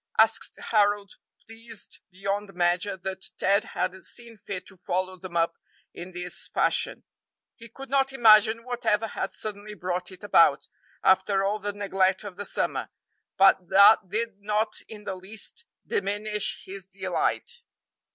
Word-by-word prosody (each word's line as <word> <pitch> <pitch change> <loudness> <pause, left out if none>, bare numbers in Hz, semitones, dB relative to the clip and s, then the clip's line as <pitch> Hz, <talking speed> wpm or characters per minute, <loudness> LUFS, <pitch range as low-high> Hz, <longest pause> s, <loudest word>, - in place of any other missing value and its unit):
asked 225 0 +3 0.2
Harold, 205 -2 +2 0.3
pleased 225 -1 -8
beyond 195 +1 -3
measure 180 +3 +1
that 190 +1 -4
Ted 200 +2 +3
had - - 0
seen 235 -1 -10
fit 195 -2 -6
to 195 - -16
follow 185 +1 -2
them 185 -1 -6
up 165 0 +1 0.3
in 175 +2 -8
this 180 0 -5
fashion. - - 0 0.5
He 230 0 -13
could 270 +4 -10
not 270 -1 +3
imagine 225 -2 +6
whatever 230 -3 0
had 195 -2 -4
suddenly 210 0 -6
brought 180 -1 -3
it 185 +2 -13
about, 165 -8 +4 0.4
after 195 +1 +3
all 205 +2 0
the 205 0 -3
neglect 195 -1 +1
of 200 -3 -8
the 205 +2 -6
summer; - - -2 0.5
but 190 -2 +5
that 200 0 +7
did 220 0 -2
not 215 +1 0
in 210 -2 -10
the 195 - -4
least 210 - -5 0.2
diminish 205 +1 -1
his 190 0 -8
delight. 195 - -2
200 Hz, 145 wpm, -26 LUFS, 185-215 Hz, 0.5 s, that